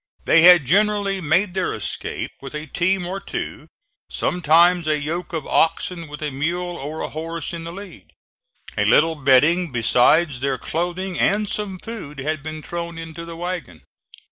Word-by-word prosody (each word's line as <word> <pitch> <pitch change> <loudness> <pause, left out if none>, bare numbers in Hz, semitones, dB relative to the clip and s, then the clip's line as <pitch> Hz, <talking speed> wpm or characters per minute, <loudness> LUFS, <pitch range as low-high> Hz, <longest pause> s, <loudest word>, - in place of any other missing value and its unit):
They 165 - +5
had 175 -3 +8
generally 200 +3 +2
made 180 +5 +1
their 185 -1 -1
escape 105 - -4
with 135 +1 -8
a 150 +1 -5
team 180 +4 0
or 190 +2 -4
two, - - -6 0.4
sometimes 175 0 +3
a 155 -1 +1
yoke 165 +4 -4
of 160 -4 -4
oxen 170 +1 0
with 150 +1 -8
a 150 - -2
mule 175 +6 -2
or 155 +1 -6
a - - -3
horse 165 +1 -5
in 165 -1 -6
the 165 - -6
lead. 195 +2 -11 0.6
A - - +1
little 165 +2 +5
bedding 150 +4 +3
besides 125 +5 +3
their 135 0 -1
clothing 175 +5 -3
and 210 +1 +2
some 200 -2 -3
food 185 -9 -8
had 150 +2 -3
been 155 0 -7
thrown 170 -1 -5
into 165 0 -7
the 170 0 -8
wagon. 175 - -5
165 Hz, 170 wpm, -21 LUFS, 150-180 Hz, 0.6 s, had